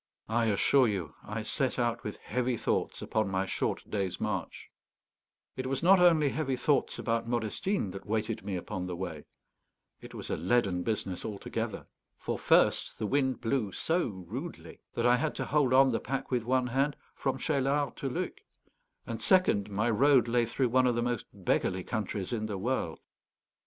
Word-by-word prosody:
I 115 +1 +2
assure 120 +5 +4
you 95 -8 -3
I 110 +1 -4
set 130 +4 -1
out 120 -1 0
with 105 - -5
heavy 125 -1 -1
thoughts - - -1
upon 110 -2 0
my 95 0 0
short - - -2
day's 95 -3 -2
march. 100 -3 -4 0.8
It 130 0 -3
was 135 +4 -2
not 190 +2 +7
only 165 -5 +5
heavy 135 -2 -1
thoughts 140 +3 +1
about 115 -1 -1
Modestine 120 - -1
that 95 +1 -9
weighted 110 +1 -1
me 100 - -3
upon 90 +1 -4
the 90 - -4
way; 85 -4 -5 0.8
it - - -11
was - - -6
a - - 0
leaden 95 0 +1
business 95 -2 -2
altogether. 105 -2 -4 0.3
For - - -3
first, - - +3
the 110 - -2
wind 130 +2 +1
blew 115 -3 0
so 170 -1 0
rudely 110 - -7
that 115 - 0
I 125 0 +5
had 155 +3 -1
to - - -2
hold 145 -4 +2
on 135 0 +6
the 115 - 0
pack 135 +1 -4
with 120 -3 0
one 130 +1 +2
hand 135 +4 +1 0.2
from 135 - -1
Cheylard 140 -1 0
to 135 - -2
Luc; - - -3 0.7
and 115 -1 -5
second, 115 - +3
my 105 +3 0
road 130 +1 +5
lay 120 0 +2
through 125 +2 0
one 130 +1 +4
of 120 - +2
the 120 - 0
most 120 -2 -2
beggarly 95 -1 0
countries 105 -2 -3
in 110 -2 -1
the 105 -2 -3
world. 105 -5 -1
120 Hz, 180 wpm, -30 LUFS, 105-135 Hz, 0.8 s, not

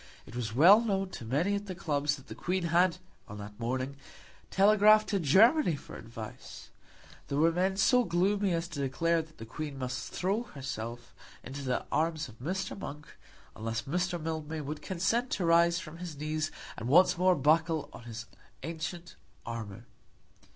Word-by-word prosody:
It 110 - -12
was 115 -2 -3
well 185 - +8
known 195 -4 0
to 115 - -7
many 150 - +1
at 200 0 -3
the 185 - -5
clubs 150 -3 0
that 135 -3 -14
the - - -8
Queen 185 +1 -2
had 170 +1 +3 0.3
on 105 - -8
that 105 +1 -9
morning 130 +4 -2 0.5
telegraphed 215 +2 +5
to 200 - +1
Germany 195 - +5
for 140 - -10
advice. 110 -1 -9 0.6
There 140 - -2
were 165 +3 +4
men 190 +3 0
so 250 +5 +4
gloomy 195 +2 +1
as 165 0 -1
to 155 -4 -6
declare 165 +5 +1
that 160 0 -16
the 115 - -8
Queen 145 +4 -6
must 130 -2 -4
throw 195 +5 0
herself 120 -3 -6 0.3
into 135 +2 -7
the 130 -2 -1
arms 160 -1 0
of 115 -2 -15
Mr. 185 +9 -3
Monk, 150 -5 -8 0.5
unless 115 +1 -3
Mr. 180 +4 -1
Mildmay 160 -1 -4
would 150 +1 -5
consent 225 +7 0
to 180 - -1
rise 170 +1 +5
from 165 -1 -8
his 175 -4 -7
knees 155 +1 -2 0.3
and 115 +2 -4
once 180 +5 +6
more 180 +1 +4
buckle 160 +2 +2
on 120 - -11
his 115 -2 -7 0.4
ancient 165 +2 -5 0.3
armour. 110 -4 -6
160 Hz, 170 wpm, -30 LUFS, 135-185 Hz, 0.6 s, well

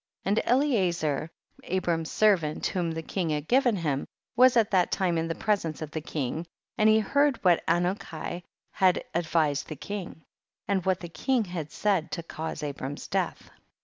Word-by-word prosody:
59. 195 - +1
And 215 - 0
Eliezcr, 170 - 0 0.4
Abram's 170 -3 -1
servant 180 -8 +2
whom 175 -3 0
the 160 0 -4
king 175 0 -2
had 150 0 -2
given 250 -3 +3
him, 150 -7 -1 0.3
was 250 0 +6
at 220 -3 +3
that 185 -3 +3
time 185 -3 +1
in 165 0 0
the 165 - -2
presence 195 -8 -1
of 155 -1 -6
the 160 - -3
king, 155 +2 -3 0.3
and 215 0 +4
he 215 - +6
heard 280 +5 +2
what 175 -3 +4
Anuki 175 -1 -1 0.3
had 185 -1 +3
advised 155 -4 +1
the 155 - -6
king, 175 +1 -6 0.4
and 195 -2 +1
what 190 -1 +1
the 175 - -5
king 245 +8 0
had 170 -5 -5
said 195 -6 0
to 170 - -3
cause 160 -1 -5
Abram's 140 -1 -5
death. - - -2
175 Hz, 175 wpm, -27 LUFS, 160-205 Hz, 0.4 s, was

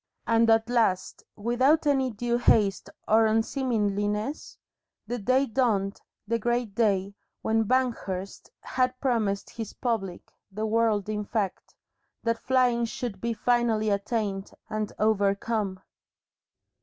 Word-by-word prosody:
And 230 0 +3
at 225 0 +4
last, 225 -7 +1
without 255 +9 +2
any 270 -3 +3
undue 240 +1 -1
haste 205 -4 +3 0.2
or 220 +1 +5
unseemliness, 215 0 -1 0.5
the 245 0 -3
day 255 +6 +2
dawned, 220 -6 0 0.3
the 230 +1 0
great 240 -1 -1
day, 200 -3 +1 0.3
when 225 0 +2
Banghurst 205 -6 -2
had 255 0 -1
promised 220 -7 0
his 225 -3 -6
public 205 -8 -3 0.2
the 215 +3 -3
world 220 -2 +1
in 210 -1 -2
fact 205 -2 -3 0.5
that 230 0 0
flying 250 -2 +2
should 225 -3 -5
be 235 0 -1
finally 230 -2 +1
attained 200 -1 -2 0.2
and 215 -1 -2
overcome. 205 -1 0
225 Hz, 120 wpm, -27 LUFS, 205-240 Hz, 0.5 s, or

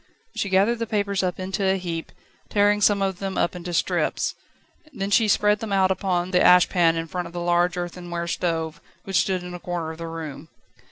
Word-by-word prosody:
She 200 - -2
gathered 200 +5 +3
the 230 - -2
papers 200 -2 0
up 180 -1 -2
into 190 +2 -3
a 190 0 +2
heap, 170 -3 -5 0.4
tearing 205 0 +3
some 205 -1 +4
of 190 -2 -2
them 195 -1 -4
up 175 - +1
into 175 0 -6
strips; 170 - 0 0.6
then 200 -6 -4
she 220 +1 +4
spread 210 0 +3
them 220 -1 -5
out 190 -1 +3
upon 185 -1 -1
the 180 - +3
ash 180 0 +6
pan 170 -2 +3
in 165 0 -2
front 180 +2 -4
of - - -13
the 175 - -4
large 175 +1 +1
earthenware 175 -1 -4
stove, 165 -2 -2 0.2
which 195 -1 -1
stood 185 -2 -1
in 180 0 -7
a 175 - -6
corner 175 -2 -4
of 160 - -11
the 165 - -5
room. 160 -1 -7
180 Hz, 215 wpm, -24 LUFS, 175-195 Hz, 0.6 s, ash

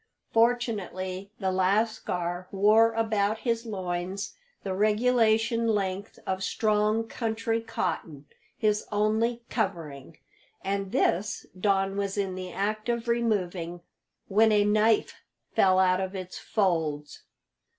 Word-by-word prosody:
Fortunately 205 -5 0
the 190 -2 0
lascar 185 -2 0
wore 215 +3 +5
about 220 -2 +1
his 230 -1 -1
loins 190 -1 -3 0.3
the 195 - -2
regulation 225 +2 +2
length 200 -2 -1
of 190 0 -2
strong 215 +1 +1
country 225 0 -2
cotton 165 -9 -4 0.3
his 210 -2 +1
only 220 +3 +1
covering 165 - -3 0.5
and 195 0 -2
this 195 +5 0
Don 195 0 +1
was 200 0 -2
in 195 -2 -1
the 185 -1 -6
act 215 +3 -2
of 235 0 -1
removing 185 -7 -1 0.5
when 220 +3 +4
a 205 -1 +4
knife 215 +1 +2 0.3
fell 185 -1 +4
out 185 0 +3
of 190 +1 -4
its 185 -1 -6
folds. 160 -8 -1
205 Hz, 115 wpm, -27 LUFS, 185-225 Hz, 0.5 s, wore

